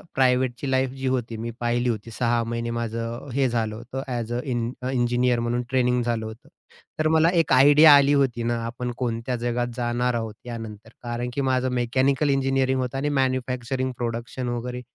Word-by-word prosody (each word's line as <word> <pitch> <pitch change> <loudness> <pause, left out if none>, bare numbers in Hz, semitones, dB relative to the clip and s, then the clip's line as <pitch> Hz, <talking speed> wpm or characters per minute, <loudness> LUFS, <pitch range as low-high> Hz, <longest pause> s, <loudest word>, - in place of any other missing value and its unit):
प्रायव्हेटची 130 0 +1
life 130 0 +2
जी 135 0 -3
होती, 115 -3 -3
मी 115 +1 -4
पाहिली 120 +1 0
होती. 115 0 -4
6 120 0 0
महिने 115 0 -3
माझं 115 +2 -4
हे 135 0 +2
झालं 110 -2 -1
होतं 125 +4 -6
ॲज 120 -1 -3
अ 120 - -1
इं 120 -1 -1 0.2
इंजिनिअर 120 -1 +1
म्हणून 120 +1 -1
ट्रेनिंग 125 -1 +2
झालं 115 -2 -1
होतं. 110 +2 -10 0.5
तर 155 - +2
मला 160 +1 +5
एक 160 -4 +1
आयडिया 145 +3 +8
आली 140 0 +5
होती 130 -5 +1
ना, 120 0 0
आपण 120 +1 -4
कोणत्या 120 0 -2
जगात 120 +1 -1
जाणार 120 0 0
आहोत 115 -2 -3
यानंतर 115 -2 -8
कारण 120 +1 -3
की 140 - -1
माझं 130 -1 +1
मेकॅनिकल 130 +4 +1
इंजिनिअरिंग 135 -1 +1
होतं 125 +1 -3
आणि 145 +2 -1
मॅन्युफॅक्चरिंग 130 0 -1
प्रोडक्शन 120 +1 -4
वगैरे 125 +1 -4
120 Hz, 175 wpm, -24 LUFS, 115-130 Hz, 0.5 s, आयडिया